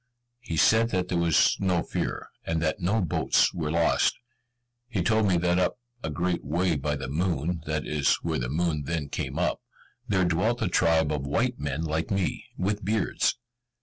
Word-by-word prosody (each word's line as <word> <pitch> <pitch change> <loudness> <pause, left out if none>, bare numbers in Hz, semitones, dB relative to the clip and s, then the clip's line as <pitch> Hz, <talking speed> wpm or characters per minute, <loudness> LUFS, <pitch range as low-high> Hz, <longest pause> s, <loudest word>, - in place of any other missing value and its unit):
He 85 -10 -5
said 110 +7 +4
that 90 -4 -1
there 90 - 0
was 85 -2 +4
no 90 -3 +1
fear, - - -3 0.2
and 80 0 -1
that 80 +3 -1
no 100 +5 +1
boats 85 - +2
were 80 -3 -2
lost. 85 +1 +2 0.7
He 105 -8 -1
told 110 +3 +3
me 90 -2 +3
that 90 +1 +2
up 90 - +1 0.2
a - - -3
great 85 +3 -1
way 85 +2 +1
by 75 +1 -1
the 65 -2 -5
moon 85 +2 -1
that 75 -1 -1
is 75 -2 +2
where 80 -3 -1
the - - -3
moon 75 -1 -1
then 80 -2 -3
came - - -4
up - - 0 0.5
there 95 -3 +2
dwelt 110 +8 +1
a - - +1
tribe 80 -3 +3
of 70 -2 -2
white 120 - 0
men 75 +2 -2
like 80 0 -2
me, 95 -2 -1
with 100 +3 -1
beards. 105 +2 0
85 Hz, 185 wpm, -27 LUFS, 80-95 Hz, 0.7 s, said